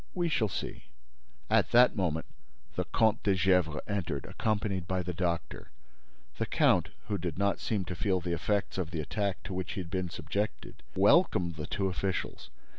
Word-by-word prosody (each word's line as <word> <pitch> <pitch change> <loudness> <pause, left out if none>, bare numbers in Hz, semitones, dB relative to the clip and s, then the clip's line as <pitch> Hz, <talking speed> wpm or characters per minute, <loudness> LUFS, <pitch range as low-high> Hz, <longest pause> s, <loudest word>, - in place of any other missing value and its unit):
"We 175 -2 +1
shall 110 -9 +1
see." - - -5 0.6
At - - +3
that 125 +1 +7
moment, 85 -6 0 0.5
the - - -1
Comte 110 0 +2
de 100 -2 +2
Gesvres 90 -4 +2
entered, 95 -9 -2
accompanied 100 -4 -1
by 95 -1 0
the 90 +1 -3
doctor. 85 -1 -2 0.7
The - - 0
count, - - +3 0.2
who 105 -2 -1
did 85 -3 -3
not 100 +1 +1
seem 100 -4 -1
to 90 - -4
feel 95 +1 +1
the 90 0 -2
effects 100 +4 -1
of 85 -4 -2
the 85 -2 -4
attack 100 +5 -2
to 95 - -6
which 90 0 -3
he - - -4
had 85 -1 -9
been 95 -2 -1
subjected, 85 +7 -4
welcomed 95 - +4
the 75 -1 -5
two 95 - -1
officials. 95 0 -2
95 Hz, 180 wpm, -30 LUFS, 85-100 Hz, 0.7 s, that